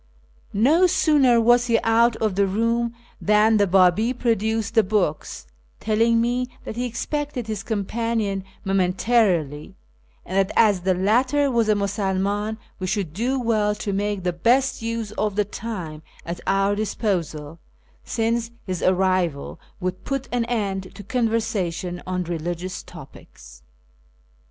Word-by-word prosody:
No 305 - +4
sooner 275 -8 +4
was 240 +1 +4
he 230 -1 +3
out 230 +1 +3
of 215 -3 -1
the 200 +1 +2
room 230 +4 0 0.3
than 215 +1 +4
the 205 -1 +3
Babi 190 +6 +4
produced 225 -2 0
the 225 - +6
books, 185 - -1 0.3
telling 230 +2 +2
me 245 +2 0 0.2
that - - -6
he 245 +1 -2
expected 280 +2 -3
his 215 -2 -4
companion 220 -1 -2 0.2
moment 190 -1 +1
arily, 185 - +1 0.5
and 185 - -6
that 195 +1 +1
as 205 -4 +4
the 185 +1 +1
latter 255 +9 +2
was 230 -3 +1
a 215 - +4
Musulman 200 +1 -1 0.2
we 185 - -3
should 185 -5 -2
do 250 +8 -1
well 215 -3 +1
to 205 -1 -4
make 205 -1 -2
the 180 -1 0
best 245 +11 +2
use 225 -2 -3
of 210 -2 0
the 210 0 +1
time 185 -8 -6 0.2
at 170 +1 -5
our 195 +1 +2
disposal, 170 -7 -3 0.4
since 230 0 -1 0.2
his 185 -3 -3
arrival 185 -5 0 0.2
would 185 0 -4
put 275 -1 -3
an 240 -1 0
end 195 -6 -3
to 205 - -9
conversation 200 -6 -1
on 180 0 -1
religious 175 +2 -4
topics. 65 0 -14
210 Hz, 140 wpm, -23 LUFS, 185-230 Hz, 0.5 s, the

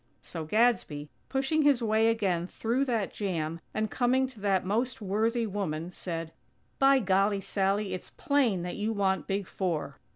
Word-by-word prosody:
So 165 -2 -6
Gadsby, 160 -7 +1 0.2
pushing 270 +4 +1
his 285 -5 +4
way 220 0 +3
again 190 -7 +1
through 240 +7 0
that 230 -6 -1
jam, 165 -5 -2
and 215 -1 -2
coming 260 +1 +2
to 255 -4 -10
that 195 -2 +1
most 230 +5 0
worthy 220 +3 0
woman, 180 -5 -3
said: 165 -3 -5 0.5
"By 275 0 +6
golly, 200 -2 +2
Sally! 195 0 0
It's 185 - -6
plain 260 - +1
that 180 - -4
you 215 +2 -1
want 195 -2 0
Big 195 0 -1
Four." 165 -8 -3
205 Hz, 160 wpm, -29 LUFS, 185-235 Hz, 0.5 s, By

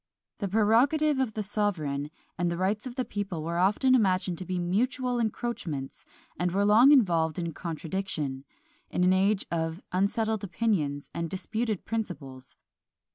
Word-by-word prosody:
The 200 - -1
prerogative 255 +9 +3
of 255 -5 0
the 215 - -2
sovereign 160 -9 -1 0.3
and 175 +1 0
the 170 - -2
rights 205 +6 -1
of 245 - -8
the 255 -1 -1
people 195 -6 -4
were 170 +2 -2
often 210 +8 +3
imagined 185 -6 +2
to 185 - -6
be 185 +1 -2
mutual 245 +8 0
encroachments, 210 - -3 0.3
and 180 +1 +1
were 200 +3 +2
long 225 +7 +7
involved 170 - +3
in 170 -2 -3
contradiction, 160 -5 -4 0.5
in 180 - 0
an 180 +1 +5
age 195 +2 +2
of 165 0 -2
unsettled 210 +3 0
opinions 180 -9 -1
and 170 -1 -3
disputed 220 +3 -2
principles. 140 - -5
190 Hz, 150 wpm, -28 LUFS, 170-220 Hz, 0.5 s, long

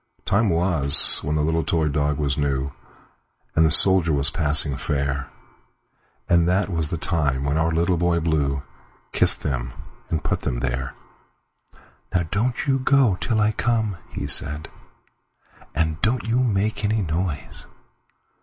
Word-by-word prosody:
Time 105 +2 +1
was 85 -5 +4
when 75 - -3
the 75 - 0
little 80 +1 0
toy 80 0 0
dog 75 0 -1
was 70 -3 -1
new, 70 -2 -2 0.8
And 80 - +4
the 80 - +4
soldier 90 +1 +6
was 70 -1 +2
passing 75 -3 +2
fair; 70 -1 -3 1.0
And 85 0 +2
that 95 +2 0
was 80 -4 -2
the 85 - -3
time 75 -5 0
when 70 +1 -1
our 80 +1 0
Little 85 +2 0
Boy 85 0 +1
BlueKissed 70 -4 -1
them 65 -2 -3 0.4
and 80 - -2
put - - -2
them - - -3
there."Now 65 +6 -8
don't 120 +5 -1
you 135 -1 +1
go 130 -6 +2
till 115 -3 -1
I 105 +1 +2
come," 110 -4 -1
he - - -6
said,"And 80 +1 -4
don't 115 +2 0
you 115 +2 0
make 110 -3 -1
any 105 0 0
noise!" 80 -4 -5
80 Hz, 140 wpm, -22 LUFS, 70-95 Hz, 1.0 s, soldier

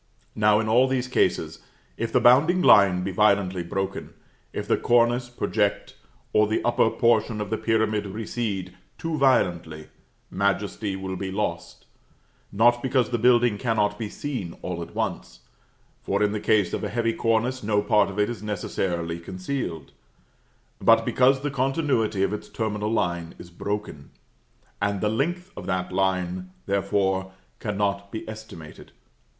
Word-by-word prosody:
Now, 105 0 +3
in 110 - -1
all 120 +4 +4
these 130 -1 -1
cases, 125 - 0 0.4
if 115 0 -3
the 125 - +3
bounding 150 +10 +5
line 95 -3 +6
be 95 - -2
violently 95 -2 +2
broken; 95 +3 -4 0.4
if - - -5
the - - +3
cornice 120 +1 +2
project, 105 -4 -1 0.4
or 105 0 +4
the 110 - 0
upper 120 -1 +3
portion 115 -2 +1
of 105 0 -4
the 110 - 0
pyramid 110 -2 0
recede, 100 -3 -4 0.2
too 165 -1 -3
violently, 85 - +1 0.4
majesty 100 0 -1
will 95 0 -5
be 95 +1 -4
lost; 90 -4 -4 0.7
not 120 +3 +4
because 130 -2 +1
the 120 - 0
building 120 -2 +4
cannot 110 -4 0
be 110 -2 -4
seen 125 -13 -5
all 90 -1 -4
at 85 - -9
once, - - -4 0.6
for 100 +2 0
in 105 - +2
the 105 - -2
case 105 -3 +2
of - - -2
a - - -2
heavy 115 0 0
cornice 115 +3 0
no 105 -1 +1
part 105 0 +3
of 100 - -8
it 105 0 +2
is 120 -3 -6
necessarily 90 -5 -3
concealed 90 - -5 0.9
but 115 0 +5
because 130 +2 +3
the 145 0 -2
continuity 130 -7 0
of 100 +1 0
its 105 - -6
terminal 105 -1 -2
line 85 -6 -1
is 85 - -12
broken, 100 -6 -5 0.7
and 100 -1 0
the 105 - 0
length 175 - -2
of - - -8
that 90 0 -2
line, 90 -1 -1 0.2
therefore, 95 -1 0 0.3
cannot 100 -1 -2
be 110 - -6
estimated. 110 -8 -10
105 Hz, 155 wpm, -25 LUFS, 95-120 Hz, 0.9 s, line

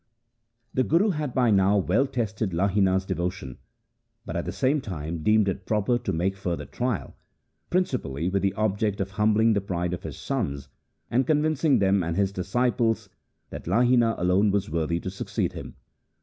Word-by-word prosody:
The 130 - +2
Guru 175 - +3
had 150 -5 -3
by 125 -3 +3
now 100 0 +4
well 130 +8 +2
tested 110 -6 -2
Lahina's 95 0 +2
devotion, 90 -7 -4 0.7
but - - -6
at - - -2
the - - -3
same 140 +3 +1
time 85 - -5
deemed 105 +3 +3
it 95 0 -3
proper 110 +3 +1
to - - -3
make 90 +4 0
further 85 -6 -3
trial, 120 - -3 0.5
principally 120 - -1
with 100 +1 0
the 100 0 0
object 105 -1 0
of 95 0 -2
humbling 110 +2 +3
the 100 - +1
pride 90 -2 -2
of 90 - -4
his - - -7
sons, 75 - -3 0.4
and 125 +3 +2
convincing 155 -1 +2
them 100 0 +3
and 85 0 -2
his 100 -1 +2
disciples 115 +4 0 0.4
that - - -8
Lahina 120 +3 +3
alone 90 +4 +3
was 100 -5 -1
worthy 85 +1 0
to 95 - -5
succeed 95 - -3
him. - - -8
100 Hz, 170 wpm, -26 LUFS, 90-120 Hz, 0.7 s, now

